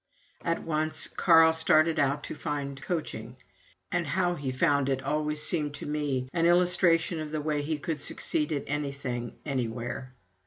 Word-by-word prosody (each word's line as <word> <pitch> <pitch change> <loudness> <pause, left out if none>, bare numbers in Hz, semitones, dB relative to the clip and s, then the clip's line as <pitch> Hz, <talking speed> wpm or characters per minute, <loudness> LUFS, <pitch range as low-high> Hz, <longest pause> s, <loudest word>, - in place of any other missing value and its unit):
At 170 0 -1
once 155 0 +3
Carl 165 -2 +5
started 160 0 +3
out 145 +1 +1
to - - -5
find 140 -2 -4
coaching; 165 0 -4 0.5
and 175 -3 0
how 175 +2 +1
he 140 -6 -4
found 140 0 +2
it 135 -1 -1
always 150 +2 -1
seemed 150 -3 -1
to - - -7
me 145 -4 -2
an 165 0 +2
illustration 175 -1 +3
of 155 -1 -5
the 155 0 -3
way 150 -1 -1
he 155 +1 -2
could 150 0 -4
succeed 150 +1 -1
at 145 -2 -1
anything 135 -4 -4
anywhere. 125 -1 -4
150 Hz, 160 wpm, -28 LUFS, 140-165 Hz, 0.5 s, Carl